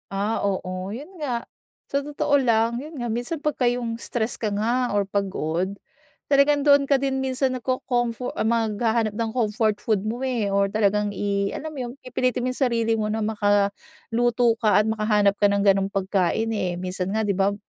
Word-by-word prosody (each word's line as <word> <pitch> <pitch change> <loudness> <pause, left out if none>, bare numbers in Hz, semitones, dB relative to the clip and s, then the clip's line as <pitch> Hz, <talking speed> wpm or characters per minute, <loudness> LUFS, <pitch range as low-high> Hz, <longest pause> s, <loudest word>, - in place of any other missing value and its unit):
Ah, 200 +3 -1
oo 185 -1 -2
yun 260 +8 -7 0.2
nga, 240 -4 -2 0.4
sa 280 0 -1
totoo 290 0 0
lang 235 -3 +2
yun 305 -1 -9
nga 240 - -2
minsan 240 +8 -3
pagka 300 -3 -1
yung 240 -2 -3
stress 230 0 -2
ka 215 -2 -2
nga 235 +5 0
or 205 -1 +1
pagod. 190 -3 -1 0.6
Talagang 285 +1 +4
doon 285 -1 +6
ka 275 -1 +2
din 270 0 -1
minsan 260 0 0
nagcocomfor 245 -1 -2
maghahanap 225 -1 +1
ng 225 0 -2
comfort 220 -2 0
food 215 -4 0
mo 220 +3 -3
eh 245 -6 -1
or 200 0 +2
talagang 205 0 +1
i 200 0 -1
alam 315 +1 -5
mo 300 - -10
yun - - -7
pipilitin 255 -1 -1
mo 255 - 0
yung 255 - -7
sarili 235 -4 +1
mo 210 - 0
na 215 +1 -1
maka 205 -2 +2 0.4
luto 240 0 +3
ka 210 -3 +4
at - - -5
makahanap 210 -2 +2
ka 205 - +5
ng 200 0 +1
ganong 195 -1 +4
pagkain 195 +3 0
eh. 185 -5 -1
Minsan 185 +2 -3
nga 220 - +1
di 205 - +1
ba 195 +1 +1
220 Hz, 185 wpm, -24 LUFS, 200-250 Hz, 0.6 s, doon